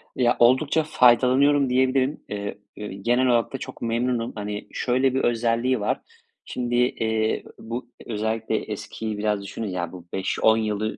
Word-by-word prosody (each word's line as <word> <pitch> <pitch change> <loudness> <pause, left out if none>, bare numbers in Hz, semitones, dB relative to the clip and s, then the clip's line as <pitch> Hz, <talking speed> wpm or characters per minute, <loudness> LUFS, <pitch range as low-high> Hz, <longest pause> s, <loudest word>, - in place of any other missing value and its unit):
Ya, 120 -2 +3
oldukça 135 +6 +4
faydalanıyorum 135 +1 +4
diyebilirim. 130 +2 +1
Eee, 100 -1 -4 0.2
eee, 105 - -6
genel 120 +6 +1
olarak 115 -1 +2
da - - -2
çok - - -9
memnunum. 120 0 -1
Hani, 105 -1 -5
şöyle 130 +1 +1
bir 130 - 0
özelliği 120 +1 +1
var. 105 - -1 0.4
Şimdi, 120 -1 -3
eee, 110 -3 +1 0.2
bu 115 +2 -6 0.2
özellikle 110 0 -2
eskiyi 110 -2 -5
biraz 105 -1 0
düşünün, 105 +3 -5
ya, 90 -3 -3
bu 90 -2 -11
5-10 110 +3 +2
yılı 110 -1 -2
115 Hz, 150 wpm, -24 LUFS, 110-125 Hz, 0.4 s, oldukça